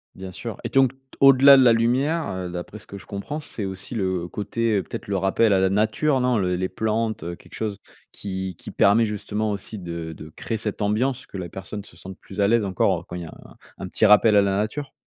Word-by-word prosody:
Bien 95 0 -8
sûr 115 +3 -6
et 120 - -3
donc 135 +2 +4 0.3
au-delà 135 0 +8
de 135 - +6
la 120 -2 +6
lumière, 130 +8 +1
heu, 90 -1 -4
d'après 90 +4 -7
ce - - -14
que 100 - -8
je 95 - -13
comprends, 125 +10 -5
c'est 110 -8 -5
aussi 95 +4 -7
le 95 -5 -2
côté, 105 0 -1
peut-être, - - -8
le 100 -1 -1
rappel 95 +4 +2
à 95 - +4
la 95 0 +3
nature 110 +8 +1
non? 125 -2 +2
Le 90 -2 0
les 95 +1 -2
plantes, 110 0 -2
heu, 85 +1 -5
quelque - - -19
chose 105 -3 -3 0.4
qui 95 -2 -5
qui - - -9
permet 105 +4 +4
justement 105 0 -2
aussi 100 +2 -6
de 85 -3 -6
de 80 0 -11
créer 115 - -3
cette 105 0 -4
ambiance, 125 +6 0
que 100 - -8
la 90 -2 -5
personne 95 +3 -7
se 90 - -18
sente 95 +2 -10
plus 100 - -10
à 100 - +4
l'aise 115 +1 +3
encore, 90 -2 0
quand 90 - -8
il - - -6
y - - -7
a - - -9
un - - -16 0.2
un 95 - -6
petit 100 +5 +1
rappel 105 +1 +6
à 100 - +7
la 100 -1 +1
nature? 120 +8 -3
105 Hz, 245 wpm, -23 LUFS, 95-115 Hz, 0.4 s, au-delà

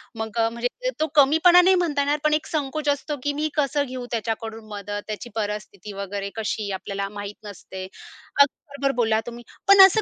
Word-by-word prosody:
मग 220 +1 -5
अ, 225 - +4
म्हणजे 245 - -3
तो 315 - +2
कमीपणा 320 +5 +7
नाही 375 +1 +5
म्हणता 320 -6 +1
येणार 290 +1 +1
पण 305 0 +3
एक 310 +1 +1
संकोच 295 0 -1
असतो, 285 +1 -1
की 290 0 0
"मी 305 +1 -1
कसं 285 -1 +1
घेऊ 255 -2 -6
त्याच्याकडून 225 -1 -3
मदत?" 205 0 -5
त्याची 215 +3 -5
परिस्थिती 210 -2 -4
वगैरे 200 0 -4
कशी 215 -2 -2
आपल्याला 195 +1 -3
माहित 205 0 -7
नसते. 190 -2 -8 0.6
अगदी 280 - +5 0.2
बरोबर 280 -1 0
बोलला 225 -2 +2
तुम्ही, 240 0 -8 0.2
पण 395 0 +8
असं 410 +3 +3
240 Hz, 185 wpm, -24 LUFS, 210-295 Hz, 0.6 s, पण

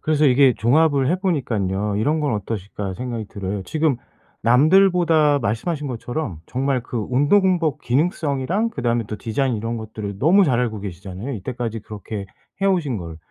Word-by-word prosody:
그래서 155 -1 +2
이게 130 -1 +5
종합을 140 +2 +3
해 180 - +2
보니깐요 105 - -1
'이런 150 +9 +1
건 145 -7 0
어떠실까.' 100 -1 -4
생각이 120 -1 -4
들어요. 100 0 -4
지금 155 -2 +1 0.5
남들보다 160 - +4
말씀하신 145 - -2
것처럼 120 - -4
정말 130 0 -1
그 120 - -6
운동복 165 +3 +2
기능성이랑 155 - 0
그다음에 120 - -1
또 105 - -5
디자인 120 +5 -1
이런 115 +2 -3
것들을 110 -3 -6
너무 180 - +5
잘 125 -7 +2
알고 110 -4 -1
계시잖아요 95 +5 -6
이때까지 115 +1 -4
그렇게 105 -1 -7 0.3
해 195 - +2
오신 165 - +1
걸. 85 -2 -7
125 Hz, 380 characters per minute, -21 LUFS, 110-155 Hz, 0.5 s, 이게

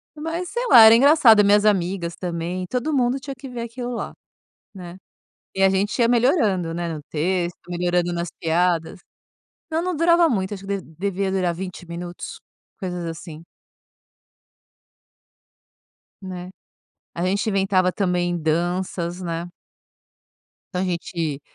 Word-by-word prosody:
Mas, 325 +4 -4
sei 485 +1 -2
lá, 235 - +9
era 220 +1 +9
engraçado 245 -5 +6
minhas 205 +1 +4
amigas 180 -4 0
também, 175 +1 -4
todo 255 - -2
mundo 255 -1 +1
tinha 275 0 -7
que 270 - -9
ver 245 -1 -6
aquilo 240 +1 -5
lá, - - -5 0.6
né. 180 -2 -9 0.6
E 195 - 0
a 195 - +7
gente 195 +4 0
ia 235 -1 +4
melhorando, 225 - +2
né, 170 0 -3
no 155 -2 -7
texto, 175 +2 -1
melhorando 175 0 0
nas 170 0 -3
piadas 170 +1 0 0.7
não 320 +1 0
não 365 0 -2
durava 335 +1 +4
muito, 195 -3 -1
acho 195 -1 -8
que 200 0 -2
devia 190 +4 -3
durar 185 -3 0
20 180 0 -7
minutos, 175 +1 -7 0.4
coisas 180 -3 -4
assim. 165 -1 -8 2.8
Né, 180 -1 -7 0.7
a 170 - -2
gente 200 +4 0
inventava 190 -2 +2
também 180 -2 0
danças, 175 +2 -2
né. 170 -1 -4 1.3
Então, 180 - -1
a - - +1
gente 170 -4 -3
185 Hz, 135 wpm, -22 LUFS, 175-225 Hz, 2.8 s, lá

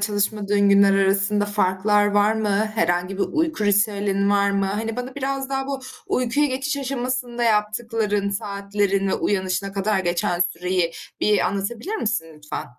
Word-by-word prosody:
çalışmadığın 205 -1 +1
günler 200 0 +5
arasında 195 +1 +2
farklar 205 0 +2
var 205 +1 +3
mı? 220 -1 -1 0.3
Herhangi 180 0 0
bir - - +2
uyku 315 -8 0
ritüelin 200 -1 +2
var 200 0 +3
mı? 200 -1 0
Hani, 220 +4 -3
bana 250 +1 -5
biraz 270 -1 -3
daha 270 0 -2
bu 275 -1 -3 0.3
uykuya 255 +4 +1
geçiş 275 +2 -2
aşamasında 255 -3 -3
yaptıkların, 210 -1 0
saatlerine, 200 -1 -1
uyanışına 195 0 -1
kadar 200 +1 0
geçen 175 -1 -1
süreyi 180 0 0 0.3
bir 210 -1 +3
anlatabilir 225 - -3
misin, 215 - -1
lütfen? 150 0 -6
205 Hz, 140 wpm, -22 LUFS, 195-235 Hz, 0.3 s, günler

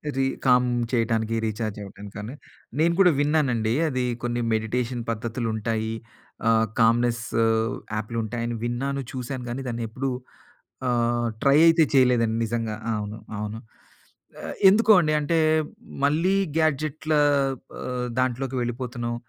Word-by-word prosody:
రి 135 - +1 0.2
కామ్ 125 -1 +5 0.2
చేయటానికి 115 -1 0
రీచార్జ్ 110 -1 -3
అవ్వటం 100 +1 -11
కానీ. 105 +4 -6 0.5
నేను 170 +1 +3
కూడా 180 -2 +7
విన్నానండి 135 -7 +1 0.2
అది 130 -2 -1 0.2
కొన్ని 120 0 -1
మెడిటేషన్ 120 +2 -1
పద్ధతులుంటాయి 110 -1 -2 0.5
ఆహ్, 115 0 +4
కామ్నెసు 115 0 +2 0.6
యాపులుంటాయి 115 +1 -3
అని 120 - -3
విన్నాను, 135 +3 -2
చూసాను, 130 0 -5
కానీ 125 +3 -4
దాన్ని 120 -1 -3
ఎప్పుడు 130 +4 -3 0.8
ఆహ్, 120 -1 +1 0.2
ట్రై 140 +1 +5
అయితే 165 0 +6
చేయలేదండి 120 -4 +3
నిజంగా. 115 -1 -2 0.2
అవును. 105 +1 -4 0.2
అవును. 105 +1 -4 0.8
ఆహ్, - - -6
ఎందుకో 220 +2 +4
అండి 155 -1 +1
అంటే 165 +3 0 0.7
మళ్ళీ 165 +7 +2 0.2
గాడ్జెట్ల 155 0 0 0.7
ఆహ్, 125 -1 -3
దాంట్లోకి 130 +1 -1
వెళ్ళిపోతున్నాం. 120 -1 -3
120 Hz, 120 wpm, -25 LUFS, 115-135 Hz, 0.8 s, కూడా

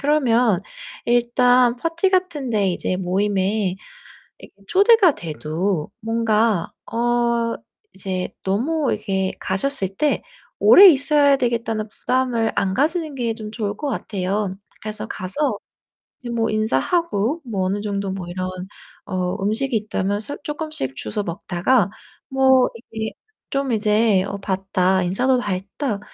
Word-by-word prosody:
그러면 250 - +3 0.5
일단 245 +1 +3
파티 330 +7 0
같은 340 -8 0
데 205 -3 +2
이제 185 0 -1
모임에 190 +1 0 0.6
이렇게 - - -15
초대가 400 -3 +5
돼도 160 - -3
뭔가 225 -4 +1 0.2
어 235 0 +1 0.4
이제 185 -1 -3
너무 265 +9 0
이렇게 195 -3 -1
가셨을 195 +1 +1
때 295 +5 0 0.4
오래 400 - +9
있어야 285 -2 +5
되겠다는 230 -4 -1
부담을 245 -1 0
안 190 -1 0
가지는 310 - 0
게 235 -3 -1
좀 215 -1 -8
좋을 210 -2 -3
것 290 - -3
같아요. 200 -4 -2 0.3
그래서 215 0 -3
가서 250 +13 -2 0.6
이제 245 - -7
뭐 225 -1 0
인사하고 220 - 0
뭐 205 -6 -2
어느 200 +2 -1
정도 200 -2 -2
뭐 190 -2 -5
이런 185 +1 -3 0.6
어 180 -2 -2
음식이 225 +4 0
있다면 205 -1 -1
서 285 +6 -5
쪼끔씩 295 - -4
주워 210 - -3
먹다가 185 +4 0 0.4
뭐 265 -1 +4 0.2
이게 220 0 -3 0.4
좀 275 -2 -1
이제 210 -2 +3
'어 200 - -5
봤다. 190 -1 0
인사도 250 +9 +2
다 205 -5 -2
했다. 200 +4 -3
220 Hz, 255 characters per minute, -21 LUFS, 195-260 Hz, 0.6 s, 오래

